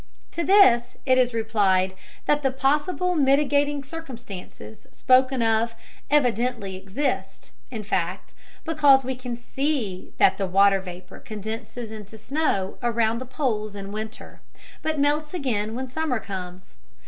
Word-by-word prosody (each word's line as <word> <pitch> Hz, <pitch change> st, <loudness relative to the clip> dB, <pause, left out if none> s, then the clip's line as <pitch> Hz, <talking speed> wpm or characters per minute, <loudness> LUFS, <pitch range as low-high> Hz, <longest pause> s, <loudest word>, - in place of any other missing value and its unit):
To 340 Hz, -, -2 dB
this 320 Hz, -10 st, +5 dB
it 255 Hz, -1 st, +4 dB
is 250 Hz, -1 st, +3 dB
replied 205 Hz, -5 st, +2 dB, 0.3 s
that 295 Hz, 0 st, +2 dB
the 270 Hz, -, +2 dB
possible 295 Hz, +7 st, +1 dB
mitigating 285 Hz, 0 st, +2 dB
circumstances 235 Hz, -, -9 dB
spoken 260 Hz, -1 st, +3 dB
of 225 Hz, +1 st, +1 dB, 0.3 s
evidently 245 Hz, -7 st, +1 dB
exist 195 Hz, +9 st, -3 dB, 0.2 s
in 225 Hz, -4 st, -5 dB
fact, 185 Hz, -2 st, -2 dB, 0.3 s
because 290 Hz, -5 st, +5 dB
we 260 Hz, -, -1 dB
can 245 Hz, -1 st, -6 dB
see 240 Hz, -7 st, -3 dB
that 190 Hz, -, +4 dB
the 195 Hz, -, 0 dB
watery 195 Hz, +1 st, +4 dB
vapor 180 Hz, 0 st, -10 dB
condenses 220 Hz, +2 st, -6 dB
into 215 Hz, 0 st, -9 dB
snow 220 Hz, -6 st, -1 dB
around 230 Hz, -1 st, +1 dB
the 255 Hz, -, -7 dB
poles 215 Hz, -7 st, -2 dB
in 200 Hz, 0 st, -7 dB
winter, 215 Hz, +1 st, -7 dB, 0.4 s
but 315 Hz, 0 st, -1 dB
melts 295 Hz, +3 st, +1 dB
again 225 Hz, -8 st, -1 dB
when 260 Hz, +1 st, -4 dB
summer 265 Hz, -2 st, -1 dB
comes. 185 Hz, -3 st, -8 dB
240 Hz, 135 wpm, -24 LUFS, 205-280 Hz, 0.4 s, this